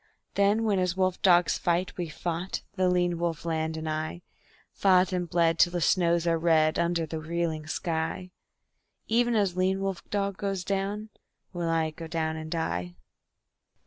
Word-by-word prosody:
Then 200 Hz, +3 st, +3 dB
when 205 Hz, -3 st, +2 dB
as 180 Hz, 0 st, 0 dB
wolf 185 Hz, -1 st, +1 dB
dogs 175 Hz, -2 st, +4 dB
fight 175 Hz, +1 st, 0 dB
we've 175 Hz, -3 st, -4 dB
fought, 175 Hz, +3 st, -3 dB
the 185 Hz, -2 st, +2 dB
lean 175 Hz, -1 st, +1 dB
wolf 170 Hz, -2 st, -2 dB
land 160 Hz, -1 st, -1 dB
and 160 Hz, 0 st, -5 dB
I; 155 Hz, +2 st, -3 dB, 0.5 s
Fought 185 Hz, -1 st, +3 dB
and 175 Hz, -2 st, -2 dB
bled 165 Hz, -1 st, +2 dB
till 175 Hz, -, +5 dB
the 175 Hz, -, 0 dB
snows 170 Hz, 0 st, +2 dB
are 165 Hz, -1 st, +2 dB
red 160 Hz, -2 st, +3 dB
under 170 Hz, -1 st, +1 dB
the 160 Hz, 0 st, -5 dB
reeling 160 Hz, -1 st, -2 dB
sky; 165 Hz, +2 st, -3 dB, 0.7 s
Even 240 Hz, +1 st, +2 dB
as 200 Hz, -4 st, +1 dB
lean 185 Hz, +1 st, +1 dB
wolf 195 Hz, -2 st, -2 dB
dog 200 Hz, -1 st, -1 dB
goes 195 Hz, -2 st, -2 dB
down 200 Hz, +3 st, -2 dB, 0.4 s
will 175 Hz, -2 st, -2 dB
I 160 Hz, -1 st, +1 dB
go 165 Hz, +1 st, -8 dB
down 160 Hz, -1 st, -2 dB
and 160 Hz, 0 st, -6 dB
die. 90 Hz, -, -2 dB
175 Hz, 170 wpm, -28 LUFS, 160-185 Hz, 0.7 s, till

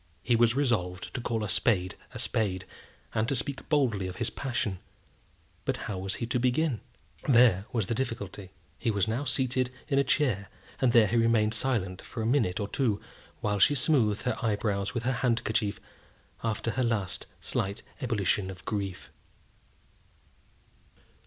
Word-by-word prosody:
He 120 Hz, -, +3 dB
was 115 Hz, 0 st, +4 dB
resolved 105 Hz, -10 st, 0 dB
to 125 Hz, -, -3 dB
call 115 Hz, -2 st, -1 dB
a -, -, -1 dB
spade 95 Hz, -3 st, +2 dB, 0.2 s
a -, -, -7 dB
spade, 95 Hz, -4 st, 0 dB, 0.5 s
and 110 Hz, +1 st, +1 dB
to 140 Hz, -, +1 dB
speak 135 Hz, +3 st, -3 dB
boldly 120 Hz, -11 st, +2 dB
of 90 Hz, -, -6 dB
his 115 Hz, +3 st, -2 dB
passion; 115 Hz, -8 st, -2 dB, 0.8 s
but -, -, -1 dB
how 95 Hz, -3 st, -3 dB
was 95 Hz, +1 st, -2 dB
he 115 Hz, -, -3 dB
to 125 Hz, +2 st, 0 dB
begin? 125 Hz, +1 st, +1 dB, 0.5 s
There 115 Hz, -7 st, +6 dB
was 115 Hz, -5 st, 0 dB
the 115 Hz, -, -1 dB
difficulty. 110 Hz, -6 st, -4 dB, 0.3 s
He -, -, 0 dB
was 100 Hz, -3 st, +2 dB
now 120 Hz, +6 st, -1 dB
seated 130 Hz, -1 st, +1 dB, 0.2 s
in 140 Hz, -2 st, +3 dB
a -, -, +5 dB
chair, 130 Hz, -8 st, +1 dB, 0.3 s
and 130 Hz, -2 st, +4 dB
there 115 Hz, -2 st, +7 dB
he 110 Hz, +4 st, +1 dB
remained 115 Hz, -2 st, +3 dB
silent 105 Hz, -6 st, -1 dB
for 115 Hz, -, -5 dB
a -, -, -1 dB
minute 115 Hz, -7 st, +2 dB
or 100 Hz, -, -1 dB
two, 110 Hz, -2 st, 0 dB, 0.4 s
while 105 Hz, -1 st, 0 dB
she 145 Hz, -, +6 dB
smoothed 120 Hz, -7 st, +2 dB
her 120 Hz, -2 st, -2 dB
eyebrows 105 Hz, -2 st, 0 dB
with 120 Hz, -, -1 dB
her 130 Hz, -, +1 dB
handkerchief 110 Hz, -4 st, +1 dB, 0.6 s
after 115 Hz, 0 st, -1 dB
her 130 Hz, -, 0 dB
last 110 Hz, -6 st, -1 dB
slight 100 Hz, +2 st, -2 dB, 0.2 s
ebullition 105 Hz, -5 st, +1 dB
of 90 Hz, -1 st, -9 dB
grief. 100 Hz, -3 st, -3 dB
115 Hz, 165 wpm, -29 LUFS, 100-125 Hz, 0.8 s, there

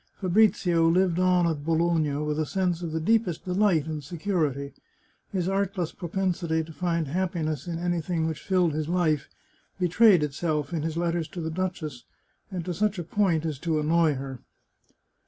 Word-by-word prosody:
Fabrizio 180 Hz, -4 st, +3 dB
Hved 180 Hz, 0 st, +2 dB
on 180 Hz, -1 st, +3 dB
at 155 Hz, -4 st, -1 dB
Bologna 165 Hz, -2 st, +1 dB
with 150 Hz, +1 st, -2 dB
a 155 Hz, -, +1 dB
sense 180 Hz, -1 st, 0 dB
of 170 Hz, -2 st, -4 dB
the 160 Hz, -, -1 dB
deepest 200 Hz, -1 st, +1 dB
deHght 180 Hz, -4 st, +2 dB
and 155 Hz, -2 st, -5 dB
se 170 Hz, +5 st, -8 dB
curity. 155 Hz, -7 st, -1 dB, 0.6 s
His 185 Hz, -3 st, -1 dB
artless 195 Hz, -3 st, -1 dB
propensity 175 Hz, -2 st, -1 dB
to 160 Hz, 0 st, -11 dB
find 170 Hz, -2 st, -1 dB
happiness 165 Hz, -2 st, -2 dB
in 170 Hz, -1 st, -3 dB
anything 175 Hz, -1 st, -1 dB
which 160 Hz, -2 st, -3 dB
filled 180 Hz, -4 st, +2 dB
his 155 Hz, +1 st, -2 dB
life, 165 Hz, -5 st, +1 dB, 0.5 s
betrayed 180 Hz, 0 st, +5 dB
itself 150 Hz, 0 st, -2 dB
in 165 Hz, -, -1 dB
his 160 Hz, +1 st, -3 dB
letters 170 Hz, -1 st, 0 dB
to 180 Hz, +2 st, -8 dB
the 160 Hz, 0 st, -3 dB
duchess, 160 Hz, -7 st, -4 dB, 0.5 s
and 180 Hz, -4 st, -5 dB
to 180 Hz, -, -2 dB
such 210 Hz, +3 st, 0 dB
a 175 Hz, -, -3 dB
point 170 Hz, -3 st, +1 dB
as 155 Hz, -4 st, -3 dB
to 160 Hz, -1 st, 0 dB
annoy 160 Hz, 0 st, +3 dB
her. 135 Hz, -1 st, -6 dB
170 Hz, 175 wpm, -26 LUFS, 155-180 Hz, 0.6 s, betrayed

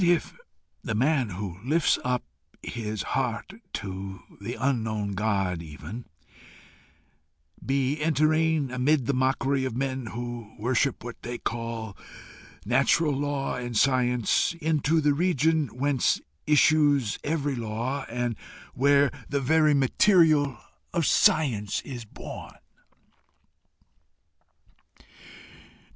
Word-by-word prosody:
What 180 Hz, -, +3 dB
if 175 Hz, -, +1 dB, 0.5 s
the 115 Hz, -, -2 dB
man 130 Hz, 0 st, +2 dB
who 95 Hz, -1 st, -6 dB
lifts 155 Hz, +5 st, +2 dB
up 125 Hz, 0 st, 0 dB, 0.4 s
his 110 Hz, -3 st, -4 dB
heart 125 Hz, +7 st, -2 dB, 0.2 s
to 95 Hz, 0 st, -5 dB, 0.2 s
the -, -, -4 dB
unknown 110 Hz, -5 st, -1 dB
God 95 Hz, -4 st, 0 dB
even, 85 Hz, +9 st, -8 dB, 1.6 s
be 135 Hz, +2 st, 0 dB
entering, 155 Hz, -1 st, +2 dB
amid 130 Hz, +2 st, +2 dB
the 140 Hz, -, +1 dB
mockery 135 Hz, +1 st, +1 dB
of 130 Hz, -3 st, -3 dB
men 130 Hz, -2 st, -2 dB
who 120 Hz, -1 st, -6 dB
worship 125 Hz, +4 st, 0 dB
what 120 Hz, 0 st, -8 dB
they 120 Hz, 0 st, -5 dB
call 115 Hz, -3 st, -4 dB, 0.7 s
natural 160 Hz, -3 st, +3 dB
law 140 Hz, 0 st, -2 dB
and 120 Hz, -2 st, -3 dB
science, 125 Hz, +3 st, +2 dB
into 160 Hz, 0 st, +1 dB
the 145 Hz, -1 st, +3 dB
region 160 Hz, -1 st, +2 dB
whence 130 Hz, +2 st, +1 dB, 0.3 s
issues 145 Hz, -5 st, +4 dB
every 145 Hz, -2 st, -1 dB
law, 120 Hz, +4 st, -3 dB
and 120 Hz, 0 st, -2 dB, 0.4 s
where 140 Hz, +1 st, +4 dB, 0.2 s
the 140 Hz, -, 0 dB
very 155 Hz, +2 st, +3 dB
material 145 Hz, -, +4 dB, 0.4 s
of 170 Hz, -3 st, +2 dB
science 115 Hz, -13 st, +3 dB
is 120 Hz, -4 st, -7 dB
born! -, -, -9 dB
130 Hz, 105 wpm, -26 LUFS, 115-145 Hz, 1.6 s, issues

